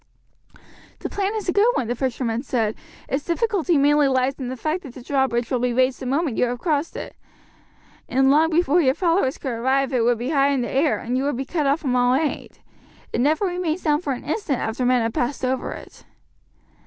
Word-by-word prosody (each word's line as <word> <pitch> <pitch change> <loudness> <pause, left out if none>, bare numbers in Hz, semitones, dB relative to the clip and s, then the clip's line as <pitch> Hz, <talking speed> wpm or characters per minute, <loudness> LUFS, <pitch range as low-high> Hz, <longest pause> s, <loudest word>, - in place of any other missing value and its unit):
"The - - -5
plan 405 +1 -1
is 425 -3 -4
a 355 - +1
good 415 +4 +4
one," 250 - -1
the 240 - 0
fisherman 240 -2 -2
said; 230 -5 -1 0.3
"its 275 +2 -2
difficulty 360 -3 +1
mainly 290 +1 +4
lies 260 0 +1
in 260 - -4
the 255 +1 -5
fact 310 +8 -2
that 270 -7 -11
the 255 - -10
drawbridge 260 -4 0
will 255 - +1
be 245 0 0
raised 255 +1 +2
the 260 - -5
moment 280 -1 0
you - - +3
have 245 0 -3
crossed 310 +1 -1
it, - - -7 0.9
and 270 +1 +3
long 315 +3 +4
before 340 0 +3
your 265 -3 +2
followers 335 -6 +1
could 265 - -4
arrive 265 +3 0
it 245 -3 +2
would 240 0 +2
be 240 +4 -3
high 280 -2 +3
in 275 -2 +1
the 240 - -3
air, 290 +3 +2
and 245 +2 -2
you 265 - 0
would 285 -4 -1
be 270 - -3
cut 300 0 -1
off 280 +4 +1
from 260 -5 0
all 245 0 +3
aid. 300 +1 -2 0.6
It 235 - +1
never 310 +8 +2
remains 355 -2 -2
down 300 -1 +2
for 285 -6 -2
an 245 - -7
instant 310 - -1
after 235 +3 -2
men 250 -2 +3
have 225 0 -2
passed 260 +1 -1
over 260 0 -1
it." - - -11
270 Hz, 230 wpm, -22 LUFS, 250-315 Hz, 0.9 s, good